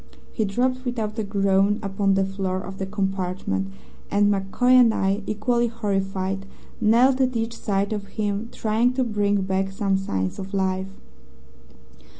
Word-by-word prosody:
"He 220 - 0
dropped 255 +5 0
without 225 -3 -3
a - - 0
groan 200 0 +2
upon 195 0 +1
the 195 0 +2
floor 190 -1 -2
of 195 0 -8
the 190 - -2
compartment, 190 - -2 0.4
and 205 0 +3
MacCoy 200 +6 +1
and 250 -3 +7
I, 195 0 0
equally 235 +3 +1
horrified, 195 -3 -2 0.3
knelt 250 +5 +4
at 255 -1 +1
each 225 0 -2
side 200 0 -1
of 205 -1 -4
him, 210 +1 -1
trying 225 +3 +1
to 260 0 +1
bring 205 -3 +1
back 190 0 -1
some 195 0 0
signs 95 - -2
of 195 +1 -5
life. 190 0 0
200 Hz, 155 wpm, -24 LUFS, 195-225 Hz, 0.4 s, and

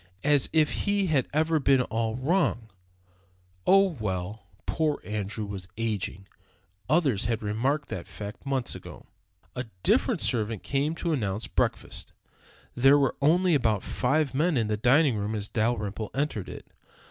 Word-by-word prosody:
As 145 -2 +3
if 155 -2 +3
he 200 -1 +2
had 150 -7 +1
ever 160 +2 +2
been 135 -2 +4
all 110 -1 -2
wrong! 130 - 0 1.0
Oh, 195 -2 +5
well, 100 0 -4 0.2
poor 155 -2 0
Andrew 105 0 -3
was 95 -3 -6
ageing; 105 -4 -2 0.6
others 140 - +2
had 115 0 -1
remarked 130 +8 -1
that 90 - -5
fact 105 +2 -8
months 135 -3 -1
ago. - - -10 0.5
A 125 - -3 0.2
different - - +3
servant 110 -3 -1
came 145 +3 0
to 170 -1 -1
announce 105 -5 -2
breakfast. - - -2 0.6
There 135 +3 +5
were 135 -3 +1
only 175 +5 +4
about 110 -8 +2
five 140 +2 0
men 155 +2 +2
in 110 -3 0
the 105 - +1
dining 130 +3 +3
room 105 +2 -2
as 105 -1 -3
Dalrymple 110 -2 -1
entered 135 -9 -2
it. - - -9
125 Hz, 145 wpm, -27 LUFS, 105-150 Hz, 1.0 s, Oh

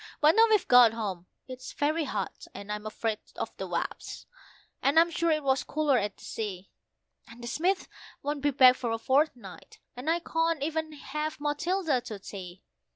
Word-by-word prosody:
But 305 +1 +6
now 450 +1 +7
we've 425 -4 +3
got 245 -3 +7
home, 195 -6 -4 0.2
it's 255 0 -8
very 305 +2 0
hot, 205 -7 -4
and 200 +1 -7
I'm 210 0 -4
afraid 215 0 -2 0.2
of - - -5
the - - -4
wasps; - - -4 0.6
and 285 +4 +4
I'm 335 +1 +4
sure 335 0 0
it 305 -2 +1
was 265 -1 +2
cooler 300 -4 +1
at 205 -1 -3
the - - -16
sea, 195 -4 -5 0.6
And 235 +1 -13
the - - -5
Smiths 360 +9 0 0.4
won't 290 0 -2
be 290 - +2
back 255 -2 +7
for 240 - -3
a 225 - 0
fortnight, 265 +1 -1 0.2
so 250 +4 -8
I 330 +1 +3
can't 325 -2 0
even 315 +1 -2
have 300 +2 -4
Matilda 295 0 0
to 215 -3 -7
tea. 190 -2 -9
275 Hz, 185 wpm, -28 LUFS, 225-315 Hz, 0.6 s, now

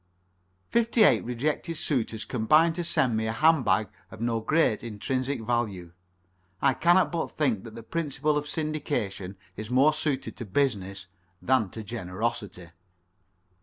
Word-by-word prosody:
Fifty 230 -1 +3
eight - - +5
rejected 150 +7 -2
suitors 115 -7 -1
combined 155 +8 +3
to 175 +1 -3
send 130 -8 +2
me 110 0 0
a - - 0
hand 155 +4 +4
bag 110 - +2 0.2
of 110 - -12
no 115 0 0
great 135 -2 +1
intrinsic 130 +3 -3
value. 110 -7 -2 0.7
I 135 +5 +3
cannot 175 +6 +3
but 170 -2 -3
think 125 -10 0
that 115 -1 -10
the 115 - -9
principle 150 +1 -1
of 150 0 -1
syndication 145 - -3 0.2
is 110 +1 -7
more 135 +5 +4
suited 150 -3 -2
to 120 - -6
business 100 -5 -1 0.3
than 130 -6 +2
to 110 +4 -7
generosity. 105 -3 -4
120 Hz, 145 wpm, -27 LUFS, 110-155 Hz, 0.7 s, eight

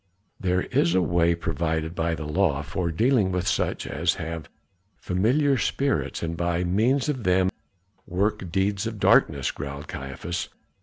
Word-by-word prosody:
"There 90 -1 +1
is 85 +1 +1
a 95 - +4
way 85 0 +2
provided 80 0 -2
by 80 -1 0
the 80 - -6
law 75 -3 +1
for 85 +3 -2
dealing 110 +3 +2
with 90 -1 -1
such - - 0
as - - 0
have 80 -1 -5 0.5
familiar 130 +9 +2
spirits 140 -8 -1
and 85 0 -2
by 85 +1 0
means 115 +11 +2
of 135 -6 -2
them 95 0 +3 0.6
work 95 0 -1
deeds 100 +3 0
of 110 -2 -5
darkness," 70 -7 +3
growled 70 +1 -7
Caiaphas. 70 +6 -5
90 Hz, 150 wpm, -25 LUFS, 80-100 Hz, 0.6 s, a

